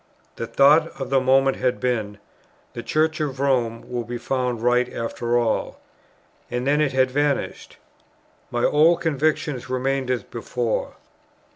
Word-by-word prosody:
The 115 - -5
thought 150 +6 +4
for 135 0 -4
the 135 0 +2
moment 135 +1 +3
had 125 -1 0
been, 110 -5 -2 0.6
"The - - -5
Church 155 0 0
of 135 -3 -3
Rome 125 -5 0
will 120 -1 -3
be 120 +1 -5
found 125 -2 -2
right 125 +1 +2
after 120 +1 -2
all;" 115 -2 -1 0.7
and 125 +1 -3
then 145 +2 +2
it 150 -3 +1
had 130 -1 +2
vanished. 145 +1 -2 0.7
My 120 0 -2
old 165 +3 +4
convictions 150 -4 -1
remained 130 +1 -1
as 125 -5 0
before. 115 0 -3
130 Hz, 145 wpm, -23 LUFS, 120-140 Hz, 0.7 s, thought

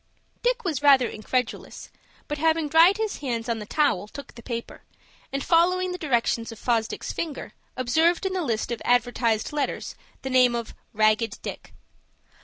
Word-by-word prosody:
Dick - - 0
was 315 -8 -2
rather 275 -4 +6
incredulous, 235 +3 -4 0.4
but, 295 0 -4
having 320 0 +2
dried 330 +6 +6
his 440 -1 -2
hands 240 -4 -3
on 230 -1 -1
the 210 - -8
towel, 285 -10 +1
took 280 +6 -10
the 235 - -12
paper, 235 -1 -6 0.5
and 275 0 -2
following 365 +2 +3
the 360 - -5
directions 235 -5 0
of 225 - -10
Fosdick's 225 -1 -1
finger, 315 -4 -5 0.2
observed 320 +9 +2
in 380 - -1
the 370 - -1
list 235 -7 -2
of 235 - -3
advertised 245 -1 +1
letters 295 -2 -2 0.3
the 265 - -4
name 250 -2 +4
of 235 -2 -4 0.2
"RAGGED 215 0 +1
DICK." - - -7
255 Hz, 165 wpm, -25 LUFS, 230-320 Hz, 0.5 s, rather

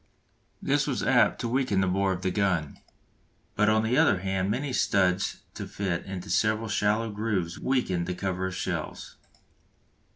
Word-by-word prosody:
This - - +1
was - - -1
apt - - +3
to - - -1
weaken 125 -5 +1
the 95 - +3
bore 95 +1 +1
of 95 0 -4
the 95 - +1
gun; 90 -6 0 0.8
but 105 +1 +3
on 110 0 +3
the 120 +6 +2
other 100 - +4
hand 95 0 -1
many 130 +5 -2
studs 100 -6 +1
to - - -6
fit 95 -4 -3
into 95 -1 -6
several 110 +2 +1
shallow 105 +2 +1
grooves 105 -5 -2
weakened 95 -10 0
the 90 - -2
cover 95 0 -2
of 95 - -5
the - - -6
shells. - - -4
100 Hz, 170 wpm, -27 LUFS, 95-110 Hz, 0.8 s, other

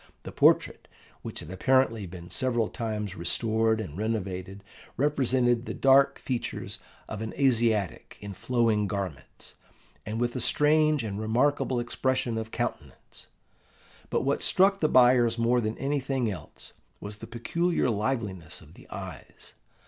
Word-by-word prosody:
The - - -7
portrait, - - +3 0.3
which - - -5
had 80 - -9
apparently 115 0 +2
been 85 0 -10
several 120 -4 0
times 105 -5 -4
restored 110 +5 +1
and 95 -9 -6
renovated, 100 -2 -3 0.3
represented 130 -4 +1
the - - -4
dark 135 0 +5
features 125 -3 -4 0.3
of 110 -1 -6
an 110 - -5
Asiatic 115 - +1
in 100 -1 -7
flowing 115 0 +1
garments, 95 -10 -6 0.5
and 110 +5 -4
with 120 +1 -1
a 125 - -2
strange 150 +1 +3
and 105 -2 -4
remarkable 125 +3 +1
expression 120 -1 -1
of 110 0 -5
countenance; - - -6 0.8
but - - +1
what 140 +1 0
struck 195 +1 +3
the 155 - +2
buyers 125 -2 +5
more 120 +1 +2
than 110 0 -3
anything 135 -4 -1
else 95 - -9 0.3
was 105 0 -7
the - - -9
peculiar 165 +9 0
liveliness 105 -7 -2
of - - -16
the - - -17
eyes. - - -9
115 Hz, 140 wpm, -27 LUFS, 105-130 Hz, 0.8 s, dark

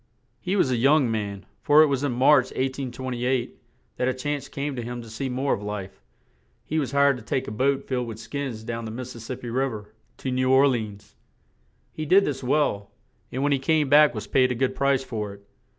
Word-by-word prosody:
He 185 +2 -2
was 140 -10 +2
a 125 - +1
young 135 0 +4
man, 100 -3 -4 0.2
for 150 +1 +6
it - - +6
was 140 -2 -1
in 145 - 0
March, 130 +2 +5
1828, 130 -1 -3 0.4
that 125 - 0
a 130 - 0
chance 145 +2 -3
came 140 0 -4
to 120 - -3
him 120 +1 -5
to 115 - -12
see 130 +4 -3
more 130 +2 0
of - - -3
life; 105 -6 -6 0.6
he 155 - -1
was 135 -5 -2
hired 140 -1 +4
to 120 - -11
take 130 +4 -2
a - - -4
boat 135 +5 0
filled 125 -2 -1
with 110 -2 -6
skins 115 -1 -5
down 115 0 -4
the - - -5
Mis 125 +3 -6
sis 115 -2 -10
sip 125 +1 -6
pi - - -5
Riv 130 +3 0
er 105 0 -11 0.2
to 130 - -4
New 130 0 +1
Or 135 +2 +6
le 130 -3 +2
ans; 105 -2 -9 0.8
he 155 -1 -5
did 195 +4 +5
this 135 -3 -3
work 125 - -4
well, 120 -10 +1 0.4
and 130 +2 -2
when 145 - +2
he 140 - +2
came 150 +1 +1
back 150 -1 +6
was 105 -1 -4
paid 130 +4 +3
a - - -1
good 130 +2 0
price 140 -1 +1
for 105 -5 -5
it. 100 0 -21
130 Hz, 235 wpm, -25 LUFS, 115-140 Hz, 0.8 s, for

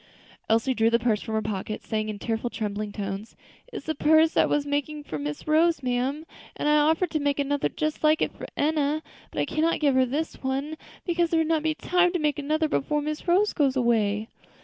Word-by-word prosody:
Elsie 230 +4 +2
drew 225 -2 +3
the 235 - +4
purse 230 -3 0
from 220 -2 -4
her 220 - 0
pocket, 215 0 -4
saying 215 -1 -2
in 210 - -4
tearful, 225 +2 -2
trembling 210 -2 -4
tones, 200 +1 -5 0.4
"It - - -6
is - - -9
a 315 - 0
purse 315 +2 +4
I - - +5
was 295 -1 0
making 290 +1 -2
for 155 - -5
Miss 150 - -5
Rose, 315 -1 +3
ma'am; 255 +5 -1 0.3
and - - -2
I 300 0 +5
offered 320 +4 +2
to 310 - 0
make 285 -1 0
another 285 0 0
just 310 0 -3
like 310 0 +4
it - - 0
for - - -8
Enna; 305 0 +1 0.3
but - - -5
I - - +2
cannot 325 +2 0
give 285 -3 +3
her 260 0 +3
this 295 +6 -3
one, 275 +4 -2 0.3
because 345 -1 +1
there 330 - +2
would 320 - 0
not 320 -1 +2
be 310 0 0
time 355 +2 +2
to 355 - 0
make 300 -2 0
another 310 +2 0
before 295 0 0
Miss 305 +4 -4
Rose 385 +5 +3
goes 280 -4 +2
away." 220 -4 +1
285 Hz, 225 wpm, -26 LUFS, 230-310 Hz, 0.4 s, I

